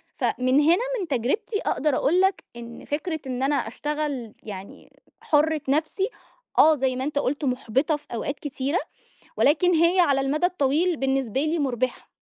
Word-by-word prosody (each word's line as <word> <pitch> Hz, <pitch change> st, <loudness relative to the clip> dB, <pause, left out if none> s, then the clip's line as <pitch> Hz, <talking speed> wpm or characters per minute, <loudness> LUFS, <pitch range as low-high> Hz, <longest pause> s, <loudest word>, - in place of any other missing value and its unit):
فمن 255 Hz, +2 st, +1 dB
هنا 345 Hz, +10 st, +4 dB, 0.2 s
من 365 Hz, -, -3 dB
تجربتي 275 Hz, -, -1 dB
أقدَر 290 Hz, -1 st, 0 dB
أقول 355 Hz, +6 st, +2 dB
لك 385 Hz, 0 st, +1 dB
إن 235 Hz, 0 st, -9 dB
فكرة 315 Hz, +2 st, -3 dB
إن 255 Hz, 0 st, -3 dB
أنا 285 Hz, +1 st, +2 dB
أشتغل 280 Hz, -2 st, -3 dB
يعني، 200 Hz, -2 st, -10 dB, 0.3 s
حُرّة 305 Hz, 0 st, +2 dB
نَفسي، 315 Hz, -, 0 dB, 0.5 s
آه 310 Hz, 0 st, +7 dB
زي 260 Hz, -2 st, 0 dB
ما 260 Hz, -, -3 dB
أنت 290 Hz, 0 st, -1 dB
قُلت 285 Hz, +2 st, -1 dB
مُحبِطة 260 Hz, +4 st, 0 dB
في 295 Hz, -, -23 dB
أوقات 280 Hz, +5 st, -3 dB
كتيرة، 285 Hz, +3 st, -2 dB, 0.6 s
ولكن 350 Hz, +5 st, +3 dB
هي 335 Hz, +3 st, +3 dB
على 280 Hz, -6 st, +4 dB
المدى 300 Hz, +6 st, +1 dB
الطويل 330 Hz, 0 st, +1 dB
بالنسبة 265 Hz, -2 st, 0 dB
لي 310 Hz, +2 st, 0 dB
مُربِحة. 255 Hz, -2 st, -2 dB
290 Hz, 155 wpm, -24 LUFS, 260-315 Hz, 0.6 s, آه